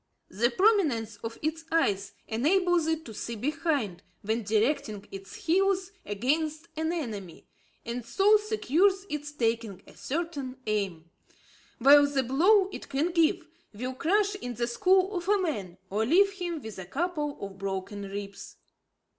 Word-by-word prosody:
The 230 +6 +2
prominence 275 - +2
of 225 +2 -6
its 320 +1 -2
eyes 205 -12 +1
enables 340 - +2
it 320 0 -1
to 225 - -8
see 235 +2 -5
behind, 275 - -1 0.2
when 220 +3 0
directing 220 0 0
its 195 0 -9
heels 385 +1 +1 0.2
against 305 +9 -1
an 320 +1 -1
enemy, 215 - -5 0.4
and 235 +1 -4
so 390 - +4
secures 395 - +1
its 295 -1 -4
taking 230 -7 -1
a - - -16
certain 285 -4 -4
aim; 190 -6 -2 0.7
while 285 +3 +7
the 275 -2 0
blow 370 - +4
it - - -8
can 295 +6 0
give 335 0 +2 0.3
will 250 +4 -4
crush 400 +9 +1
in 245 -12 -6
the 235 - 0
skull 370 - +3
of 355 0 -3
a 415 - +5
man, 205 - -3
or 210 +3 +1
leave 375 - +4
him 350 -6 -4
with 220 -3 -8
a 190 - -6
couple 300 - -2
of 195 -1 -7
broken 195 +1 -4
ribs. 200 0 -7
285 Hz, 150 wpm, -28 LUFS, 220-345 Hz, 0.7 s, while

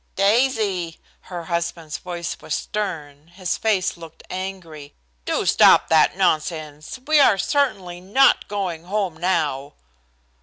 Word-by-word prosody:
"Daisy!" 200 -5 +1 0.3
Her 175 -2 -5
husband's 170 -2 -3
voice 175 -2 -5
was 155 - -3
stern, 155 -8 -5
his 180 +1 -3
face 205 -4 0
looked 165 -2 -13
angry. 180 -6 -7 0.3
"Do - - -1
stop - - +5
that 160 +2 +4
nonsense. 155 - -1
We 310 0 +4
are 230 -8 +5
certainly 190 -8 -1
not 235 +9 +3
going 185 -5 -4
home 195 -3 -2
now." 150 -6 -1
175 Hz, 120 wpm, -22 LUFS, 160-195 Hz, 0.3 s, stop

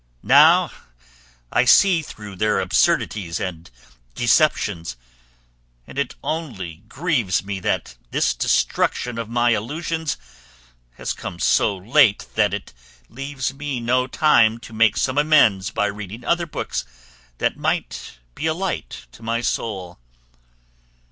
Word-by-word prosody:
Now - - +6 0.8
I 120 - +3
see 175 +7 +5
through 105 -9 -10
their 105 +2 +1
absurdities 85 -6 +1
and 85 -5 -5 0.5
deceptions, 105 - +1 0.9
and 135 - -7
it 140 - -2
only 110 - -4
grieves 130 - 0
me 100 -1 -4
that - - -2
this - - +1
destruction 115 - 0
of 115 -1 -5
my 120 0 +2
illusions 155 +8 -2 0.8
has - - -4
come 85 - -7
so 95 +3 +2
late 110 +3 +3
that - - +2
it - - -6 0.4
leaves 135 0 -4
me 140 -2 -4
no 125 +2 +1
time 115 -6 +4
to 115 - -12
make 110 -1 +3
some 130 +9 +1
amends 130 -11 +4
by 105 - 0
reading 105 +3 -6
other 170 0 +1
books - - -3 0.5
that - - 0
might - - -3 0.2
be 160 - -3
a 160 - 0
light 175 - -4
to - - -16
my 115 +1 -1
soul. 95 - -3
115 Hz, 130 wpm, -22 LUFS, 100-145 Hz, 0.9 s, Now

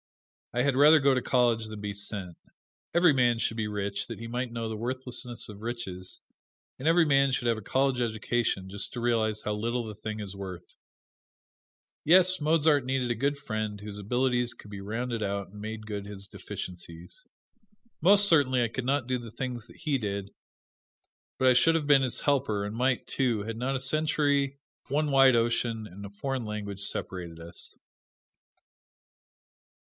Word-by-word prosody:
I 125 +1 +1
had 140 -1 +2
rather 150 +3 +7
go 140 -1 +4
to 130 - +1
college 120 -4 +2
than 110 -1 -7
be 105 0 -4
sent. 100 -3 -4 0.6
Every 170 -2 +5
man 120 -3 +3
should 115 - 0
get 110 - 0
rich, 100 -1 -2
that 115 - -6
he 115 - -6
might 125 +1 -3
know 115 -1 -3
the 110 - -4
worthlessness 125 0 -4
of 105 -1 -10
riches; 110 -6 -4 0.6
and 135 - -2
every 165 0 +5
man 140 -2 +4
should 125 -2 0
have 115 -1 +2
a - - -10
college 130 +4 +1
education, 110 -3 -1
just 100 +1 -3
to - - -5
realize 110 -3 +1
how 105 - -2
little 115 +3 -2
the 110 -1 -7
thing 110 +1 -5
is 100 -2 -6
worth. 95 -3 -7 1.4
Yes, 185 +1 +5
Mozart 150 -2 +3
needed 130 -1 0
a - - 0
good 140 +5 0
friend 110 -6 -4
whose 105 0 -7
abilities 125 +3 0
could 105 - -13
have 100 -1 -7
rounded 115 +1 -2
out 100 -1 -2
and 105 0 -10
made 110 0 -6
good 105 -2 -5
his 100 -1 -5
deficiencies. 85 -3 -8 0.8
Most 200 +4 +6
certainly 140 -7 +4
I - - +1
could 125 +2 -4
not 135 -1 +1
do 130 -1 0
the 115 -2 -9
things 120 -1 -5
that - - -16
he 150 -4 +1
did, 100 -2 -4 1.1
but 130 - +3
I 130 - +7
should 165 +6 +5
have 155 -3 0
been 145 -2 +6
his 130 -3 -1
helper, 125 -8 +1
and 105 +2 -5
might, 125 +1 +1
too, 120 -6 0
had 115 +1 -4
not 130 +4 -1
a - - -1
century, 140 -1 +1 0.3
one 150 +2 +1
wide 135 -2 +6
ocean, 115 -1 0
and 100 +2 -10
a - - -7
foreign 130 +5 -3
language 105 -2 -5
separated 85 -4 -3
us. 85 +1 -6
120 Hz, 180 wpm, -28 LUFS, 105-135 Hz, 1.4 s, rather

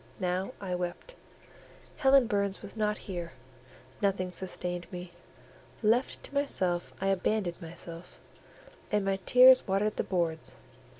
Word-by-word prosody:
Now 185 +1 -1
I 190 -3 -4
wept: 180 - -4 0.8
Helen 270 -2 +5
Burns 200 -2 -1
was 205 - -7
not 210 -1 0
here; 175 -3 -5 0.7
nothing 190 -2 0
sustained 180 -1 -4
me; 180 -1 -7 0.7
left 235 +5 +2
to - - -8
myself 185 -12 0
I 195 - 0
abandoned 195 -1 0
myself, 170 +1 -10 0.7
and 210 -2 +1
my 195 0 0
tears 255 +1 +8
watered 200 +2 +1
the - - +1
boards. 165 -7 -1
190 Hz, 125 wpm, -30 LUFS, 180-210 Hz, 0.8 s, tears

